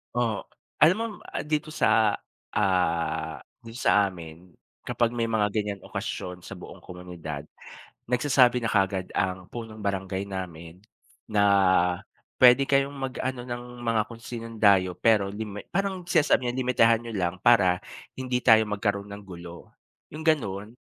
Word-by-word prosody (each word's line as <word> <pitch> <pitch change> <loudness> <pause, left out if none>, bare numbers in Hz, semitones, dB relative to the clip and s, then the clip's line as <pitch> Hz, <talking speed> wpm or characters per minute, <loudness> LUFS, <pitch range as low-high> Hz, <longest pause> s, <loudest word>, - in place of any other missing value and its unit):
Oh, 115 -4 0 0.4
alam 165 +5 +7
mo 230 - -1 0.4
dito 150 0 -1
sa, 110 -8 +3 0.3
ah, 80 -5 0 0.2
dito 115 0 -10
sa 105 -5 +3
amin 85 0 -11 0.3
kapag 120 0 0
may 115 -1 -1
mga 105 -2 +2
ganyan 105 -2 -2
okasyon 100 -4 -5
sa - - -9
buong - - -11
komunidad, 85 -5 -8 0.6
nagsasabi 125 -1 +4
na 120 - -3
kaagad 95 -2 +1
ang 90 -1 -1
punong 115 -2 -7
barangay 95 0 -2
namin 90 -3 -7 0.5
na 105 -1 +2 1.0
puwede 125 +2 +7
kayong 135 0 +2
mag-ano 130 -1 -4
ng 120 -1 -5 0.2
mga 115 -2 +2
kung 115 - -9
sinong 115 -1 -8
dayo. 95 -4 +4
Pero 105 -4 +3
limit 105 0 -7
parang 195 0 -1
sinasabi 145 -7 +3
niya 120 - -4
limitahan 120 -2 +3
niyo 115 - -6
lang 90 -3 -1
para 95 -4 +4 0.4
hindi 125 -1 -1
tayo 110 -3 +6
magkaroon 100 -1 -2
ng 100 - -8
gulo 85 -1 -10 0.4
yung 155 +2 -8
ganon. 110 -7 0
110 Hz, 140 wpm, -26 LUFS, 95-120 Hz, 1.0 s, alam